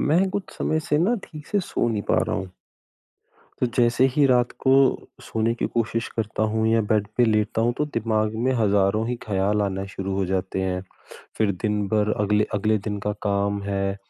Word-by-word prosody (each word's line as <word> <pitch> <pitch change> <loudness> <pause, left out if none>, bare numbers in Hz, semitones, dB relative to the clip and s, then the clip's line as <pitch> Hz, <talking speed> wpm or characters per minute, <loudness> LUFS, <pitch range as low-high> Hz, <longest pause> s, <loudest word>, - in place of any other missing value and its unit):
मैं 175 +6 +3
कुछ 200 -1 -5
समय 155 - 0
से 155 -2 0
ना 190 +9 +3
ठीक 150 -2 -11
से 205 - 0
सो 145 -9 -1
नहीं 110 -3 -1
पा - - +3
रहा - - -1
हूँ। 95 - -5 1.1
तो - - +3
जैसे 120 +1 +3
ही 145 -1 +4
रात 125 -2 +3
को 130 - +3 0.5
सोने 110 +1 0
की - - +2
कोशिश 115 0 -1
करता 110 -1 -2
हूँ 110 0 0
या 115 0 +3
बेड 105 -2 +2
पे 125 - +5
लेटता 110 0 +1
हूँ, 120 +1 +2
तो 150 - +2
दिमाग 110 -1 0
में 125 +4 0
हज़ारों 105 -1 +2
ही 125 - -1
ख़्याल 105 0 0
आना 95 -1 -2
शुरू 95 0 -5
हो 95 0 0
जाते 95 0 -2
हैं। 90 -1 -2 0.6
फ़िर 110 -2 +2
दिन 105 -2 0
भर 105 0 +1
अगले 105 +1 +2
अगले 110 +1 +2
दिन 105 0 -4
का 105 - +1
काम 100 0 0
है, 100 -1 -1
110 Hz, 200 wpm, -24 LUFS, 100-120 Hz, 1.1 s, पे